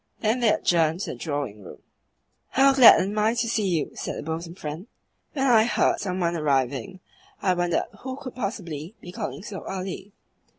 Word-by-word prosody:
Then 225 +3 +1
they 235 -3 +3
adjourned 165 0 +1
to - - -3
the - - -6
drawing 145 -9 -4
room. - - -12 0.7
"How 275 +1 +4
glad 260 -4 +9
I - - +2
am 210 +3 0
to 230 -1 0
see 220 -3 0
you!" 170 -5 -1
said - - -5
the - - -5
bosom 165 +2 -5
friend. 160 +4 -7 0.5
"When 270 -2 0
I 225 -4 +5
heard 240 - +2
some 185 -2 -3
one 170 -1 0
arriving 145 +5 -1 0.4
I 185 - +2
wondered 175 -1 0
who 260 0 -5
could 265 -2 -8
possibly 190 - -5
be 175 - -10
calling 185 - -5
so 205 -2 -7
early. 195 +1 -6
185 Hz, 185 wpm, -25 LUFS, 165-225 Hz, 0.7 s, glad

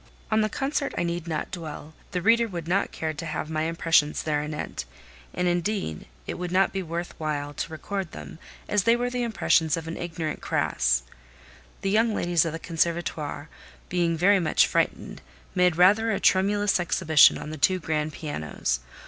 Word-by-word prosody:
On 220 0 +4
the 215 - +1
concert 280 +3 -2
I - - +1
need 170 0 -3
not 160 -2 -3
dwell; 160 -3 -7 0.2
the 180 -3 -3
reader 230 +2 +4
would 170 -5 -6
not 190 +3 +1
care 160 -1 -3
to 160 +2 -6
have 155 0 -4
my 155 0 0
impressions 165 -2 +2
thereanent: 150 0 -3 0.5
and, 180 - -1
indeed, 175 - -1 0.2
it - - -5
would 180 -1 -4
not 190 +1 +3
be 195 - -1
worth 170 0 -4
while 145 -2 -3
to 160 - -4
record 190 +2 -4
them, - - -9 0.3
as 210 - +2
they 230 - +5
were 245 +1 -1
the 250 0 -2
impressions 170 -9 +2
of 165 -1 -6
an 165 - -5
ignorance 165 -3 -4
crasse. - - +1 0.8
The 195 - 0
young 220 +1 +3
ladies 175 -1 +2
of 165 - -1
the 165 - -4
Conservatoire, 165 -3 -2 0.4
being 170 -2 +1
very 195 +4 +5
much 170 - +3
frightened, - - -1 0.3
made 180 -2 +3
rather 205 +6 +5
a 210 - 0
tremulous 205 +1 +3
exhibition 165 -3 +5
on 150 +1 -7
the 155 - -6
two 185 +6 +3
grand 155 -2 -2
pianos. 145 - -3
170 Hz, 180 wpm, -26 LUFS, 155-195 Hz, 0.8 s, they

